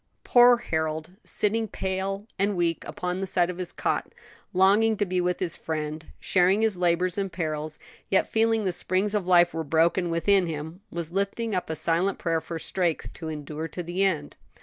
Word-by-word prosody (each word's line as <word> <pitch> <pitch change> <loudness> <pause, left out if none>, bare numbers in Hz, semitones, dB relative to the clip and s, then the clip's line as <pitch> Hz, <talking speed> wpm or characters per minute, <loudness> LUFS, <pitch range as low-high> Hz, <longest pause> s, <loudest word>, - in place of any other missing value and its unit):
Poor 245 0 +6
Harold, 160 -6 -3
sitting 220 +2 +1
pale 195 +1 -3
and 200 +1 +1
weak 170 -1 0
upon 180 +1 -3
the 195 - -2
side 180 -1 +1
of 180 - -10
his 180 -2 -3
cot, - - -2 0.4
longing 205 +4 +4
to 205 - +1
be 180 -1 0
with 180 0 -1
his 175 -3 -1
friend, 155 0 -4
sharing 190 +3 +3
his 220 -3 +2
labors 180 +1 +1
and 195 -1 -2
perils, 155 -3 -3 0.3
yet 195 - +3
feeling 225 0 +2
that 195 - 0
the - - -2
springs 190 +4 +1
of 205 -4 -1
life 175 -2 +5
were 165 0 -2
broken 165 +4 +2
within 180 +3 +2
him, 160 +3 -6
was 170 -1 -4
lifting 200 +4 -1
up 180 -3 -2
a 160 - -2
silent 170 +5 +1
prayer 165 -2 -1
for 165 - -6
strength 170 0 -2
to 160 -2 -7
endure 155 +1 -5
to 180 - -6
the 175 +3 -3
end. 160 -7 -1
180 Hz, 195 wpm, -26 LUFS, 165-195 Hz, 0.4 s, Poor